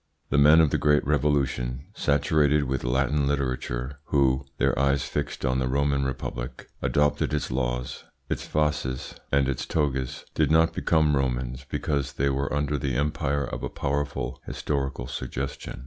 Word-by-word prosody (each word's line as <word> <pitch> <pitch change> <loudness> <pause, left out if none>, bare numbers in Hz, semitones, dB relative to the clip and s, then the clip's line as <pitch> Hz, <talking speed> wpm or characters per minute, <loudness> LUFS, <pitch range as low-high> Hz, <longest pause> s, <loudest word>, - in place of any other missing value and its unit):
The 70 - +4
men 75 +3 +7
of 75 -3 +3
the - - +1
Great 75 0 +3
Revolution, 70 -3 0
saturated 75 -2 +2
with 65 -1 -2
Latin 65 +3 +1
literature, 65 -1 -2
who 65 -2 +2
(their - - +2
eyes 70 -1 +2
fixed - - -3
on 65 0 +1
the 65 - 0
Roman 70 +1 +1
Republic), 65 -1 -5
adopted 75 0 +1
its 75 - -2
laws, 60 -1 -2 0.2
its - - -3
fasces, 75 -4 -1 0.2
and 70 -1 +3
its 70 -2 -2
togas, 65 -5 -1
did - - +2
not 80 +1 +4
become 80 -3 +2
Romans 65 0 -2
because 70 -1 -1
they 70 +1 +1
were 70 +1 -1
under 75 0 0
the 70 -4 -1
empire 70 0 0
of - - -5
a - - -3
powerful 70 -2 -2
historical 70 -4 -2
suggestion. 65 +1 -5
70 Hz, 155 wpm, -26 LUFS, 65-75 Hz, 0.2 s, men